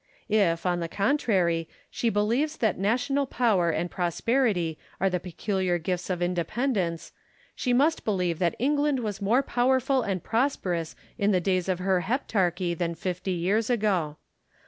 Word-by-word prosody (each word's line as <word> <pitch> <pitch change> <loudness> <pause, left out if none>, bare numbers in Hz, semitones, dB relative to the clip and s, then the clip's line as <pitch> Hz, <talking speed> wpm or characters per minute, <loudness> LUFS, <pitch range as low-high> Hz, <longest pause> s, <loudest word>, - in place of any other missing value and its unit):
If, 190 -6 +2
on 175 -1 +1
the 170 - -2
contrary, 190 - +1 0.2
she 235 - 0
believes 235 +9 0
that 220 -6 0
national 250 +7 +1
power 210 -10 +2
and 170 +2 -1
prosperity 180 - 0 0.2
are 195 0 +2
the 180 - 0
peculiar 185 0 -1
gifts 180 +2 -3
of 180 -1 -1
independence, 180 - -1 0.4
she 250 - -1
must 290 +6 +2
believe 180 -6 0
that 175 -2 +1
England 285 +1 +1
was 210 -4 -4
more 230 +7 +3
powerful 260 +1 +2
and 190 -6 -2
prosperous 195 - -1 0.2
in 200 0 +2
the 185 - +3
days 185 0 0
of 185 - +1
her 185 0 +1
heptarchy 185 -7 0
than 170 0 -2
fifty 180 +3 -4
years 200 +7 0
ago. 195 -10 0
195 Hz, 150 wpm, -27 LUFS, 175-240 Hz, 0.4 s, more